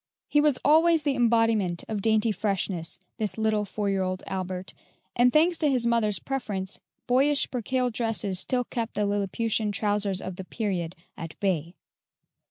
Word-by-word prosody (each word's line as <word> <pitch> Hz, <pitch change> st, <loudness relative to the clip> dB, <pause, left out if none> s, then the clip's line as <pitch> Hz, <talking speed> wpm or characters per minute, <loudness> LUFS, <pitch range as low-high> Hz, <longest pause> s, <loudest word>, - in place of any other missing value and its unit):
He 295 Hz, -, +3 dB
was 295 Hz, -3 st, +3 dB
always 320 Hz, +1 st, +5 dB
the 285 Hz, -, +1 dB
embodiment 225 Hz, -7 st, +2 dB
of 215 Hz, -2 st, -3 dB
dainty 220 Hz, +1 st, +2 dB
freshness, 190 Hz, -4 st, -2 dB, 0.2 s
this 210 Hz, -4 st, -2 dB
little 220 Hz, -1 st, +1 dB
four 205 Hz, +1 st, -3 dB
year 195 Hz, -1 st, +1 dB
old 185 Hz, 0 st, -2 dB
Albert, 185 Hz, -1 st, -5 dB, 0.4 s
and 245 Hz, +1 st, +4 dB
thanks 330 Hz, +4 st, +3 dB
to 300 Hz, -, +2 dB
his 250 Hz, -3 st, +1 dB
mother's 230 Hz, -4 st, +2 dB
preference, 205 Hz, -5 st, -4 dB, 0.3 s
boyish 275 Hz, +4 st, +2 dB
percale 250 Hz, +1 st, -1 dB
dresses 220 Hz, -5 st, 0 dB
still 250 Hz, +5 st, 0 dB
kept 230 Hz, -1 st, -4 dB
the 210 Hz, -, +1 dB
Lilliputian 205 Hz, +2 st, 0 dB
trousers 205 Hz, -2 st, 0 dB
of 185 Hz, -1 st, -6 dB
the 190 Hz, -, -5 dB
period 185 Hz, -4 st, -3 dB, 0.2 s
at 165 Hz, -1 st, -8 dB
bay. 175 Hz, -4 st, -1 dB
215 Hz, 160 wpm, -26 LUFS, 190-245 Hz, 0.4 s, always